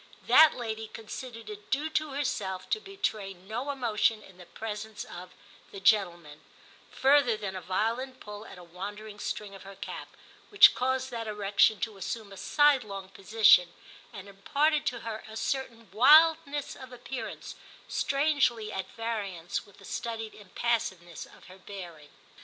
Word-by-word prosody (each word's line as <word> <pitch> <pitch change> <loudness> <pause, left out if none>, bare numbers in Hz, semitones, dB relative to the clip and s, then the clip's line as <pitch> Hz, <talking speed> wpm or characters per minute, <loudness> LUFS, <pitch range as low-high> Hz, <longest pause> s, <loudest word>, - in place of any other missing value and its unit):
That 315 -1 +7
lady 220 -2 -4
considered 225 +1 -8
it 210 -1 -9
due 290 +4 0
to 310 -1 0
herself 205 -10 -3
to 435 - +2
betray 215 - -3
no 220 +9 -5
emotion 225 -5 +1
in 190 -2 -16
the 180 - -13
presence 215 +2 -6
of 180 +1 -10 0.4
*the 195 - -8
gentlemen 175 -7 +1 0.3
* - - -26
further 270 -4 +5
than 200 -3 -5
a 185 - -5
violent 230 +8 -2
pull 210 0 -9
at - - -11
a 180 - -11
wandering 205 +4 -8
string 205 0 -4
of 195 - -11
her 195 0 -11
cap, - - -7 0.4
which 410 - +8
caused 260 +1 -1
that 230 -2 -4
erection 210 0 +2
to 215 0 -3
assume 205 +2 -5
a 195 - -10
sidelong 220 -9 +2
position, 195 -3 +4 0.4
and 195 0 -10
imparted 290 +10 0
to 240 -2 -2
her 220 -1 -6
a 220 - -8
certain 230 -2 -3
wildness 295 +5 +5
of 260 -1 -11
appearance, 245 -2 -7 0.3
strangely 275 -7 +1
at 190 0 -4
variance 205 -8 -4
with 200 - -19
the 200 - -15
studied 225 0 -4
impassiveness 195 -4 -3
of - - -18
her 185 +1 -14
bearing. 175 -7 -10
215 Hz, 155 wpm, -29 LUFS, 195-255 Hz, 0.4 s, which